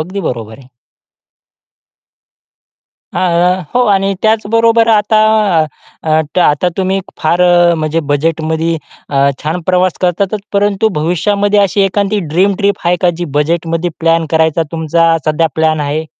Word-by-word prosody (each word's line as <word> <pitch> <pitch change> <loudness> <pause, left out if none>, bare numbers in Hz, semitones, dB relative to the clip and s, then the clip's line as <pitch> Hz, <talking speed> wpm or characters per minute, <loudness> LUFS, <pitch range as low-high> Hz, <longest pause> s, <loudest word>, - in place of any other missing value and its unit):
अगदी 185 +5 -4
बरोबर 115 - -5
आहे. 130 -2 -17 2.5
अ, - - -4 0.6
हो. 250 - +4
आणि 195 -1 +1
त्याचबरोबर 230 +1 +2
आता 215 0 +2 1.3
आता 150 +4 +2
तुम्ही 190 0 0 0.2
फार 170 +3 0
अ, 175 -1 +4
म्हणजे 155 0 -1
बजेटमध्ये 160 +2 -1 0.3
अ, 140 0 +2
छान 160 +4 -2
प्रवास 185 -1 +1
करतातच. 190 +3 0
परंतु 205 +1 +1
भविष्यामध्ये 200 +5 +1
अशी 200 0 +1
एखादी 200 +2 0
ड्रीम 195 +3 +2
ट्रिप 200 -1 +1
आहे 175 +1 +3
का 180 - +3
जी 175 - -3
बजेटमध्ये 165 +2 -1
प्लॅन 165 0 +1
करायचा 160 0 +2
तुमचा 165 0 +1
सध्या 155 +1 +1
प्लॅन 160 -1 +1
आहे. 150 +2 -2
175 Hz, 125 wpm, -13 LUFS, 160-200 Hz, 2.5 s, हो